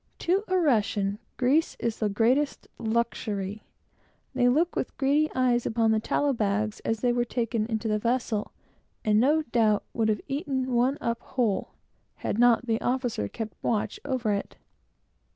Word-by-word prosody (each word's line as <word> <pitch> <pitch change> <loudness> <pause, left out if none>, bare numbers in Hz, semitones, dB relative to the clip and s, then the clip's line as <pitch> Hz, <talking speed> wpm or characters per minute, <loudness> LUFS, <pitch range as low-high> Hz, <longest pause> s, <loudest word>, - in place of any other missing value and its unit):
To 375 +4 +1
a 370 - +1
Russian, 210 - +1 0.2
grease 275 +6 +2
is 230 -1 -2
the 215 - +1
greatest 245 +8 +1
luxury. 220 -3 -2 0.7
They 245 -1 +3
looked 325 +7 +2
with - - -3
greedy 290 +2 +2
eyes 250 -2 +2
upon 225 0 +2
the 220 - +3
tallow 285 +5 +1
bags 215 -1 -1
as 225 -1 -2
they 245 -1 +2
were 240 0 +1
taken 230 -2 -1
into 225 -1 -2
the 215 -1 +1
vessel, 230 -2 -1 0.5
and, 210 0 +4
no 300 +6 +3
doubt, 225 -5 +2
would 225 -2 +1
have 210 -2 0
eaten 270 -3 -2
one 250 +4 +2
up 235 0 -1
whole, 235 -7 -1 0.4
had 215 - -3
not 245 0 +5
the 225 -1 0
officer 245 - -1
kept 215 - -6
watch 215 -3 -1
over 255 -6 -1
it. 200 - -4
235 Hz, 160 wpm, -27 LUFS, 215-260 Hz, 0.7 s, not